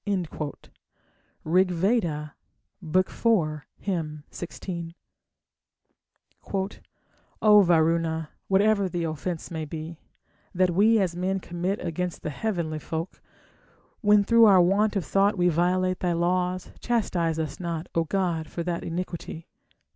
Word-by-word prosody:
Rigveda, 175 -2 +1 0.5
iv, 160 -3 -1
16. 170 -1 -6 2.5
O 210 -1 +8
Varuna, 165 -2 +2 0.2
whatever 200 0 +3
the 175 -1 -2
offence 165 +2 -4
may 160 -1 -3
be 160 +2 -7 0.6
That 185 0 +3
we 215 +6 +4
as 185 -5 0
men 190 +2 -1
commit 175 +3 -3
against 175 +1 -3
the 155 - -3
heavenly 170 -4 -2
folk, 160 +3 -5 0.8
When 210 -1 +5
through 230 +2 +6
our 195 -3 +7
want 200 +4 +3
of 190 -5 -1
thought 195 +6 +2
we 175 0 +3
violate 180 +2 +1
thy 180 -1 0
laws, 180 +1 0
Chastise 180 -9 0
us 155 -3 -3
not, 170 -1 -4
O 165 - +2
god, 170 -3 -1
for 170 - -4
that 170 -1 -3
iniquity. 170 -1 -5
175 Hz, 110 wpm, -26 LUFS, 165-190 Hz, 2.5 s, O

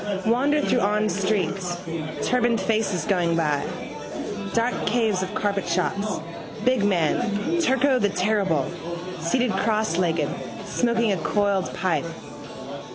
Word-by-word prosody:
Wander 275 +7 +3
through 250 - +2
awned 210 0 +2
streets. 190 -2 0 0.5
Turbaned 240 -2 +2
faces 210 -2 0
going 175 -5 +2
by. 150 -4 +1 0.9
Dark 235 +2 +2
caves 220 -4 +2
of 190 +2 -3
carpet 200 -3 0
shops, 195 +4 0 0.5
big 255 -4 +3
man, 205 - +1
Turko 265 -3 +3
the 205 - +2
terrible, 190 -6 +1 0.5
seated 225 +9 +1
crosslegged, 180 -8 +1 0.4
smoking 235 0 +1
a 195 - +1
coiled 200 +1 +1
pipe. 170 -5 0
205 Hz, 110 wpm, -24 LUFS, 180-230 Hz, 0.9 s, Wander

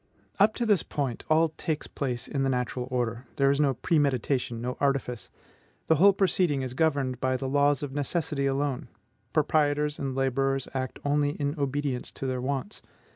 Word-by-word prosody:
Up 210 +2 +5
to 240 - -1
this 205 -6 +3
point, 135 -5 -3
all 160 +1 +4
takes 155 -2 -2
place 125 -3 -4
in 140 - -2
the 135 - +2
natural 125 0 -2
order; 120 -1 -2
there 140 0 +3
is 140 - 0
no 140 -3 +2
premeditation, 130 -3 0
no 125 +2 -3
artifice. 135 -4 -1 0.6
The 160 - +3
whole 200 +6 +7
proceeding 180 -7 +1
is 130 -1 -4
governed 140 -4 +1
by 130 0 +1
the 135 - -3
laws 145 +1 +2
of 140 -2 -4
necessity 145 -1 -1
alone. 135 -1 -1 0.4
Proprietors 150 -1 +1
and 135 -2 -3
laborers 135 0 0
act 130 -1 -3
only 145 0 +2
in 145 0 0
obedience 140 -3 -2
to - - -6
their 130 -1 -1
wants. 140 +9 -3
140 Hz, 175 wpm, -27 LUFS, 130-150 Hz, 0.6 s, whole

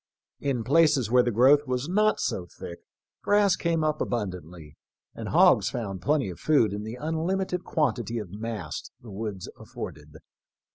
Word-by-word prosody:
In 135 -5 -1
places 140 -3 +3
where 125 0 +6
the 120 - 0
growth 135 +6 +4
was 130 +2 -2
not 215 +4 +2
so 90 -2 -2
thick 85 0 -9 0.4
grass 205 -2 +3
came 165 -2 0
up 155 -1 0
abundantly, 90 -8 -5 0.4
and - - -6
hogs - - +5
found 100 -6 -5
plenty 140 - +1
of 85 - -11
food 130 -10 +3
in 105 - -4
the 110 +3 -6
unlimited 180 +4 -2
quantity 120 -6 -1
of 105 -6 -6
mast 105 -7 -6
the 115 - -11
woods 100 -2 -5
afforded. 75 +1 -9
120 Hz, 155 wpm, -26 LUFS, 100-155 Hz, 0.4 s, where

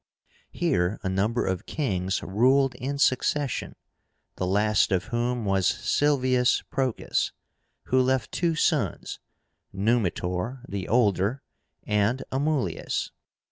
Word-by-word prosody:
Here 110 - 0
a 95 - -1
number 105 +6 0
of 95 -2 -3
kings 95 - -1
ruled 130 +7 +3
in 135 +4 -4
succession, 140 0 0 0.6
the 90 - -1
last 105 +2 +2
of 95 -2 +1
whom 120 -1 -1
was 95 -2 +2
SILVIUS 130 -4 +2
PROCAS, 130 -4 -1 0.5
who 130 0 +2
left 130 -4 0
two 170 -2 0
sons, - - 0 0.5
NUMITOR, 105 +2 -1
the 100 -2 -4
older, 110 +1 +1 0.4
and 105 +5 +1
AMULIUS. 135 - -1
120 Hz, 105 wpm, -26 LUFS, 95-130 Hz, 0.6 s, ruled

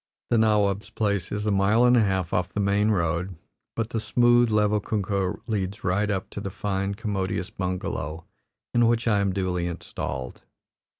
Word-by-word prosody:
The 115 - +4
nawab's 105 -2 +2
place 100 -5 -1
is 105 0 -2
a 105 - +1
mile 100 +5 +4
and 125 0 +6
a 120 - +5
half 95 -4 0
off 90 0 +1
the - - -3
main 100 +1 +2
road, 90 -1 0 0.4
but 115 0 -2
the 115 - -1
smooth, 120 +1 +4
level 105 -1 +2
kunkah 100 -2 -1
leads 100 -2 -3
right 100 +4 +1
up 95 -2 -2
to 100 - -6
the 100 - -4
fine, 100 0 -2
commodious 100 -4 -2
bungalow, 90 -4 -4 0.5
in 120 -1 +4
which 120 0 +1
I 105 -3 +3
am 100 -1 +1
duly 90 -2 -1
installed. 65 -6 -5
100 Hz, 175 wpm, -25 LUFS, 95-110 Hz, 0.5 s, and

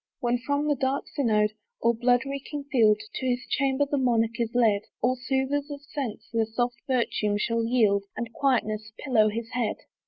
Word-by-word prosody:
When 240 -2 +1
from 285 +4 -1
the 295 - +3
dark 270 0 -1
synod, 215 -6 +2 0.3
or 235 - +3
blood 245 +2 +2
reeking 280 +1 -5
field, 215 -5 +5
To 260 - -3
his 250 +1 0
chamber 275 0 +1
the 285 0 -1
monarch 230 -2 +1
is 230 -2 +1
led, 220 -4 +4 0.2
All 250 +2 +2
soothers 265 +3 -1
of 290 -1 -6
sense 270 -7 -5
their 225 -1 +1
soft 240 +1 -2
virtue 230 -5 +1
shall 230 +2 0
yield, 215 -4 +2
And 235 -1 -4
quietness 215 -6 0
pillow 225 -6 +3
his 230 +2 -5
head. 240 -3 0
245 Hz, 180 wpm, -27 LUFS, 225-270 Hz, 0.3 s, field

